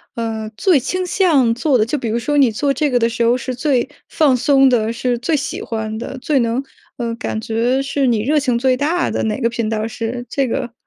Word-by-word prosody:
呃， 225 -2 -3
最 360 -7 +4
倾 365 +8 -2
向 315 -11 +3
做 270 +2 +2
的？ 215 - +2
就 265 +6 -2
比 250 - -4
如 225 - 0
说 290 +5 -1
你 265 -5 +5
做 275 +6 0
这 295 +3 0
个 250 -2 +2
的 230 0 +2
时 235 0 -1
候 235 +1 +3
是 255 +1 -4
最 260 -1 0 0.2
放 285 -5 +3
松 270 +1 +4
的， 230 -2 +1
是 245 +1 -1
最 255 +7 0
喜 285 -1 -3
欢 220 -1 -4
的， 245 +3 -6
最 280 +2 +1
能 235 +2 0 0.3
呃， 235 -2 -2
感 220 - -4
觉 235 +4 0
是 275 0 -1
你 230 -3 +2
热 300 +5 +2
情 255 -4 0
最 255 +1 +2
大 325 +6 0
的， - - -1
哪 215 +1 -1
个 235 - +2
频 230 -1 -2
道 220 0 -1
是 230 +2 -5
这 275 +1 0
个？ 235 0 -3
245 Hz, 255 characters per minute, -18 LUFS, 230-275 Hz, 0.3 s, 你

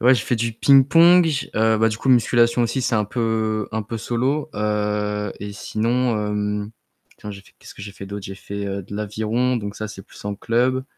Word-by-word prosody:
ouais, 125 +3 +6
j'ai 115 - -2
fait 125 - 0
du 115 0 -1
ping-pong, 165 +8 +6
j 145 -3 -2
heu, 110 0 +3
bah, 110 +1 +2
du 110 - -5
coup, 135 - -3
musculation 120 -1 +4
aussi, 120 +3 -1
c'est 120 - 0
un 105 -1 +2
peu 110 -1 -1
un 110 0 -2
peu 115 +2 -6
solo. 130 +7 -1
Heu, 105 -1 -1
et 100 0 -6
sinon, 115 +3 -1
hem, 105 0 -2 0.5
tiens 105 - -8
j'ai 100 -1 -9
fait - - -22
qu'est-ce - - -13
que - - -11
j'ai 100 0 -8
fait 100 - -10
d'autre? 100 0 -7
J'ai 95 - -7
fait, 100 +1 -6
heu, 100 0 -4
de 100 +2 -8
l'aviron, 110 +4 -1
donc 100 -1 -6
ça, 110 - -5
c'est 105 -2 -9
plus - - -16
en 105 0 -3
club, 125 +5 0
110 Hz, 225 wpm, -21 LUFS, 105-120 Hz, 0.5 s, ouais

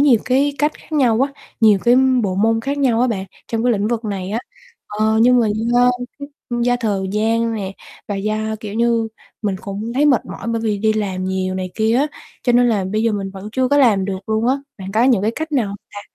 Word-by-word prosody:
nhiều 275 -6 +5
cái 275 +3 +2
cách 295 +2 +2
khác 320 - -18
nhau 250 -6 +3
á, 275 +1 +1 0.3
nhiều 215 -3 +6
cái 240 +1 +5 0.3
bộ 190 -2 -1
môn 225 +3 +2
khác 280 +3 -3
nhau 245 -5 +2
á, 250 - +4
bạn, 195 -5 -2 0.2
trong 225 0 -1
cái 245 - +4
lĩnh 210 0 0
vực 235 -1 -2
này 195 -2 -4
á. 225 - -1 0.5
Ờ, 215 +1 +1
nhưng 250 0 +5
mà 225 - +2 0.2
do 245 +1 +4 0.3
cái 285 0 -7 0.3
do 245 0 +2
thời 195 -4 -1
gian 225 +2 +1
nè, 195 -2 -4 0.4
và 205 - -2
do, 215 +2 -1 0.3
kiểu 210 -1 -6
như, 230 -1 +1 0.3
mình 200 -2 -1
cũng 205 +4 -5
thấy 290 +3 +3
mệt 265 -5 +3
mỏi 230 - -7
bởi 230 -1 -1
vì 210 -2 0
đi 215 +1 +2
làm 190 -4 -2
nhiều 185 0 -2
này 185 -1 -4
kia 220 +1 +2
á, 285 +4 +2 0.4
cho 245 - +2
nên 245 0 +4
là 205 -4 +1
bây 215 +1 +1
giờ 230 -1 +2
mình 195 -2 -3
vẫn 195 +2 -8
chưa 260 0 +1
có 285 - +3
làm 215 -8 +4
được 195 0 -5
luôn 220 +2 +1
á. 265 - +4 0.2
Bạn 190 0 -7
có 225 +2 +3
những 240 -7 +3
cái 220 - +2
cách 315 +5 -5
nào 245 -7 +2
hông 200 - -6 0.2
ta? 205 - -6
225 Hz, 250 wpm, -19 LUFS, 200-245 Hz, 0.5 s, nhiều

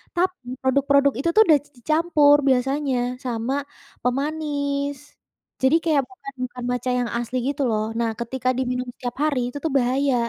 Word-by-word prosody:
tapi 355 -7 -1 0.2
produk-produk 280 +1 +3
itu 335 - +1
tuh 440 - +8
udah 305 -3 +6
di - - -23
dicampur 305 +1 +4
biasanya 270 +1 +1 0.3
sama 240 +1 -2 0.5
pemanis. 285 +1 -1 0.7
Jadi 265 +4 +4
kayak 305 -5 +2
bukan 275 -8 -10
bukan 250 0 -9
matcha 250 +1 -1
yang 245 -1 -1
asli 240 +2 -3
gitu 285 0 -3
loh, 215 -1 0 0.2
nah 230 -1 +1
ketika 255 +1 -2
diminum 250 -1 -2
setiap 245 -1 -5
hari 300 -4 +1
itu 285 - -7
tuh 320 - 0
bahaya, 260 +2 +1
275 Hz, 160 wpm, -23 LUFS, 250-290 Hz, 0.7 s, tuh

